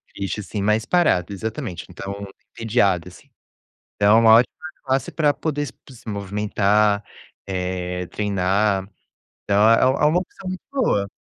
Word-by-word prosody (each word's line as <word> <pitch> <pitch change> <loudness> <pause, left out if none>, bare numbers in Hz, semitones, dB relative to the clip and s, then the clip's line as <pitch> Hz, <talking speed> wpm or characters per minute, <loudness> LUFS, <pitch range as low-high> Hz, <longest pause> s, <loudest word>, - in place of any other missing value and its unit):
triste, 100 +1 -3
assim 105 0 -5
mais 105 +3 +1
parado, 150 - +2
exatamente. 110 - -5
Então, 100 +2 -7 0.3
entediado 100 -6 +1
assim. 140 +10 -18 0.7
Então 105 +2 +5
é - - +7
uma 115 -1 +6
ótima 120 +2 +3 0.3
classe 135 -1 -1
pra 150 -3 +2
poder 150 0 -3
s 145 - -7
p 135 - -18
se 120 - -17
movimentar, 105 +1 +1 0.4
eh, 90 -1 -3
treinar. 100 0 0 0.6
Então, 105 +2 +4
é 115 - +4
é - - +5 0.2
uma 155 +4 +3
opção 185 +1 -8
muito 185 0 -5
boa. 220 - 0
105 Hz, 150 wpm, -22 LUFS, 100-125 Hz, 0.7 s, é